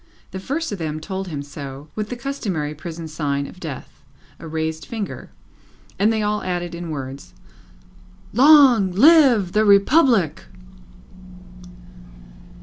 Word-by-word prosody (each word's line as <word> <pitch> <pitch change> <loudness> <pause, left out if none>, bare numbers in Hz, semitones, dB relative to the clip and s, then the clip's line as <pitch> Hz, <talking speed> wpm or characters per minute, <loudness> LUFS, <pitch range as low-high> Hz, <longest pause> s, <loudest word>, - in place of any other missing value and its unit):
The 190 - -6
first 290 - -3
of 200 - -5
them 155 -1 -4
told 190 +3 -5
him 145 -5 -5
so, 140 0 -9
with 215 -1 -4
the 245 - -4
customary 205 - -4
prison 165 +1 -8
sign 145 -2 -2
of 180 - -12
Death 150 -7 -9 0.4
a 165 - -9
raised 160 0 -3
finger 220 -4 -6 0.7
and 210 +3 +3
they 220 -1 -1
all 210 0 -1
added 175 -2 -4
in 170 0 -6
words, 135 -2 -7 1.0
"Long 255 -6 +6
live 255 - +5
the 215 +3 +2
Republic!" 200 - +3
185 Hz, 130 wpm, -21 LUFS, 155-220 Hz, 1.0 s, Long